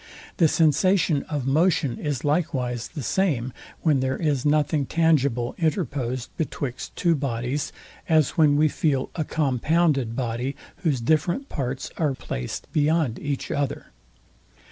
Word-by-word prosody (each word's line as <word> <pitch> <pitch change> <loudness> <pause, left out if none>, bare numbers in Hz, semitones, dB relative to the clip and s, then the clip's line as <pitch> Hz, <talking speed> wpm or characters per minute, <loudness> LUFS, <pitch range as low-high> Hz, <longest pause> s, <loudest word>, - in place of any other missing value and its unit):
The 165 - +5
sensation 165 0 +3
of 145 -5 -2
motion 150 -2 +2
is 145 -4 -3
likewise 135 -6 0
the 145 - -7
same, 130 - 0 0.3
when 150 -5 +3
there 130 0 0
is 145 -6 0
nothing 145 -1 +2
tangible 140 -7 +2
interposed 140 -7 -1
betwixt 140 -5 -4
two 170 -1 +2
bodies, 130 -1 -2 0.4
as 155 -4 +4
when 150 -4 +4
we 155 +1 +5
feel 140 -3 0
a 160 - -1
compounded 145 -3 +1
body, 125 +2 -2 0.2
whose 145 -8 0
different 165 - +1
parts 135 +2 -3
are 150 -5 +1
placed 60 - -5
beyond 150 -5 +2
each 145 -2 -3
other. 140 -1 -2
145 Hz, 130 wpm, -24 LUFS, 130-160 Hz, 0.4 s, The